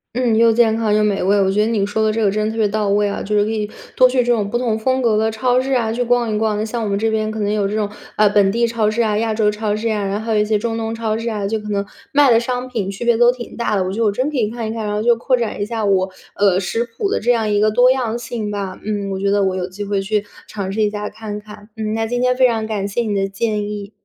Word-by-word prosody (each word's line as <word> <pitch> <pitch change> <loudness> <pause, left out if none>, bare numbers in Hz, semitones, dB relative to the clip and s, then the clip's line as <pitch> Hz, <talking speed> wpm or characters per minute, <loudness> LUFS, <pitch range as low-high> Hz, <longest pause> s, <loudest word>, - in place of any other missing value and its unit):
嗯， 245 -3 +2
又 230 0 +5
健 225 -1 +3
康 220 -2 +1
又 215 0 +3
美 205 -2 +1
味。 200 +2 +3
我 190 0 +2
觉 210 +2 +2
得 - - 0
你 210 -4 +1
说 210 +2 -2
的 215 - +2
这 225 0 -1
个 200 - +3
真 210 +1 -1
的 215 - -1
特 225 - -7
别 220 -2 +3
到 210 0 -1
位 205 +1 +2
啊， 200 - -3
就 210 +1 -1
是 205 - +4
可 215 - -2
以 210 -2 -2 0.3
多 255 - +6
去 255 0 0
这 245 - +1
种 210 -3 -1
不 240 - 0
同 230 -3 -1
风 260 +3 +1
格 225 -3 +2
的 220 +1 +2
超 245 +3 +1
市 270 +1 -2
啊， 230 -3 +1
去 235 +2 -2
逛 240 -2 +1
一 210 - 0
逛， 215 -1 0
那 210 - -1
像 230 +1 -3
我 220 - -2
们 200 - 0
这 220 +2 0
边 215 0 0
可 220 0 -5
能 205 0 0
有 210 -2 +1
这 205 - -3
种， 210 -1 0 0.3
啊， 210 - +4
本 200 -1 +3
地 235 +3 +1
超 230 -2 0
市 225 +2 0
啊， 210 -2 0
亚 225 0 0
洲 215 -1 +2
超 210 0 -2
市 220 +2 -2
呀， 210 -2 -1
然 195 +1 -1
后 220 - -7
还 225 - 0
有 - - +3
一 - - +1
些 215 0 +1
中 225 +2 -2
东 225 0 -3
超 220 -1 -1
市 230 +1 -3
啊， 210 -3 -3
就 220 +2 -1
可 210 0 -8
能 200 -1 -1 0.3
卖 285 -2 +5
的 230 - +5
商 250 +1 -3
品 220 -6 -3
区 195 +3 -6
别 235 -1 +3
都 240 +1 +6
挺 245 -1 -9
大 235 -3 0
的。 190 - +1
我 185 - -3
觉 210 - -4
得 230 - +2
我 205 - +3
真 255 +8 -1
可 290 - -3
以 215 -3 +1
看 235 0 -5
一 220 - -3
看， 220 -2 -4
然 210 - -2
后 210 - -1
就 235 0 +4
扩 255 +2 +1
展 220 -3 -3
一 - - 0
下 225 0 -3
我， 190 -1 +2 0.3
呃， 195 -2 +3
食 200 +5 -1
谱 240 - -3
的 - - +1
这 240 - +2
样 225 -3 +1
一 205 - +2
个 215 +1 +4
多 245 +4 +5
样 240 -3 -1
性 230 -3 -4
吧。 195 -2 -4
嗯， 205 -1 -3
我 190 - -3
觉 200 +1 0
得 200 0 +2
我 190 -1 0
有 180 -1 -2
机 190 +3 -7
会 200 -1 -1
去 210 +1 -1 0.2
尝 195 -3 -4
试 215 +3 -1
一 210 - +3
下 210 0 -4
看 210 -2 -7
看。 210 0 -13
嗯， 215 -1 -3
那 225 0 -1
今 245 +2 -1
天 250 0 +2
非 255 0 +5
常 225 -2 -1
感 205 -2 -2
谢 205 +4 -1
你 215 -3 -2
的 195 -1 0
建 210 +1 -2
议。 205 -1 -6
215 Hz, 360 characters per minute, -19 LUFS, 205-230 Hz, 0.3 s, 多